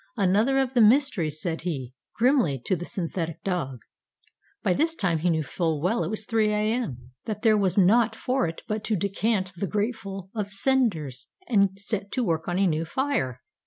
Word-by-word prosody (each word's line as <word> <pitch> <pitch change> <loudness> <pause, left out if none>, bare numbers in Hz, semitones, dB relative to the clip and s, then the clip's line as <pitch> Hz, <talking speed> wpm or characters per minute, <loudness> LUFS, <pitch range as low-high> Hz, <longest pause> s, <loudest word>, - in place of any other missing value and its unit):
Another 210 +7 +3
of 265 -1 +1
the 245 - +4
mysteries, 210 - +3
said 165 -1 -2
he, 135 -8 -4 0.2
grimly, 235 - +3
to 185 - +1
the 175 0 -6
synthetic 165 -3 -4
dog. 170 -9 -2 0.9
By 180 - +3
this 325 - +1
time 180 - 0
he 175 +3 +1
knew 160 -2 +1
full 160 +1 -1
well 190 +10 +1
(it - - -3
was 215 -1 -2
3 220 -1 +2
A.M.) 210 - -2
that 210 -1 -4
there 220 -1 +5
was 195 -3 +1
naught 220 +5 +4
for 255 -3 0
it 165 - -7
but 215 0 -2
to 220 - +1
decant 195 0 -1
the 190 +3 -2
grateful 200 -2 -3
of 210 -3 -3
cinders 195 - 0 0.2
and 200 - +2
set 200 0 -3
to 255 - 0
work 165 -6 -1
on 175 0 -1
a 195 - +3
new 160 -3 +1
fire. 165 - -1
195 Hz, 190 wpm, -26 LUFS, 165-225 Hz, 0.9 s, there